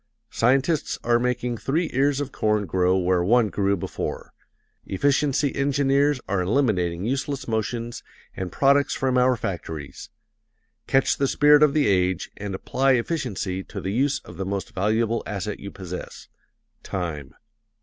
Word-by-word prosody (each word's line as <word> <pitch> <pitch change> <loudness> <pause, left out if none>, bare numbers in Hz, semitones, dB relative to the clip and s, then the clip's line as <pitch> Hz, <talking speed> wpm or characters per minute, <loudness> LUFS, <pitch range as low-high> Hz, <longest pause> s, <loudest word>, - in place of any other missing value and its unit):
Scientists 135 +6 +1
are 120 0 +3
making 125 0 -1
three 160 +9 0
ears 140 +1 +2
of 145 - -3
corn 105 -1 0
grow 90 0 +2
where 90 -1 +2
one 115 +3 +3
grew 100 0 0
before; - - -5 0.5
efficiency 140 +5 +1
engineers 140 0 +2
are 100 -2 0
eliminating 95 -5 0
useless 135 +2 -2
motions 115 +1 -3 0.3
and 95 -1 -4
products 140 0 +3
from 130 -1 0
our 125 0 +3
factories: 80 -9 -6 0.8
catch 135 0 +2
the 140 - +1
spirit 150 +2 +5
of 150 -1 +4
the 150 - +3
age 90 -2 +1
and 100 -2 -4
apply 135 +7 +1
efficiency 115 - -2
to - - -7
the 95 - -3
use 135 +4 +1
of - - -11
the 95 - -2
most 100 +3 -4
valuable 110 +4 +1
asset 105 +1 -4
you 100 - -7
possess 90 -2 -8 0.5
time. 80 -6 -5
115 Hz, 145 wpm, -24 LUFS, 95-135 Hz, 0.8 s, spirit